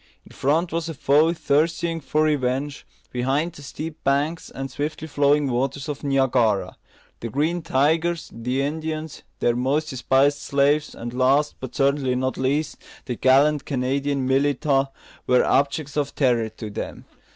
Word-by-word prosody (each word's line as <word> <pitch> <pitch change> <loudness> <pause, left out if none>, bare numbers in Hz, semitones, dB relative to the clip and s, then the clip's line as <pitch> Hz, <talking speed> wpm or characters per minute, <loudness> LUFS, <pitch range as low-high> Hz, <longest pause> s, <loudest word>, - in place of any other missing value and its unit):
In - - -17
front 160 +6 0
was 165 0 -2
a 165 - -5
foe 150 +4 +3
thirsting 165 +1 0
for 155 +2 +1
revenge; 140 -1 -1 0.2
behind, 135 +7 0
the 145 - -12
steep 155 +3 -7
banks 145 +4 0
and 135 0 -6
swiftly 150 +2 -4
flowing 145 0 +2
waters 135 +3 -1
of 150 -1 -5
Niagara. 125 -9 +1 0.4
The 115 - -5
"Green 160 +8 0
Tigers," 160 +4 +1
the 125 +4 -2
Indians, 155 +1 -4 0.2
their 120 - +2
most 140 +5 0
despised 135 +2 +2
slaves, 145 +2 +1
and 120 +1 -6
last, 135 +4 +2
but 130 -2 -8
certainly 140 -2 +1
not 130 +1 -1
least, 140 +4 -1 0.3
the 125 - -3
gallant 140 +3 +3
Canadian 135 +1 -1
militia, 135 +1 +2 0.4
were 125 0 +4
objects 145 +1 +1
of 145 -2 -1
terror 120 -5 +2
to 110 -1 -8
them. - - -6
140 Hz, 150 wpm, -23 LUFS, 130-150 Hz, 0.4 s, were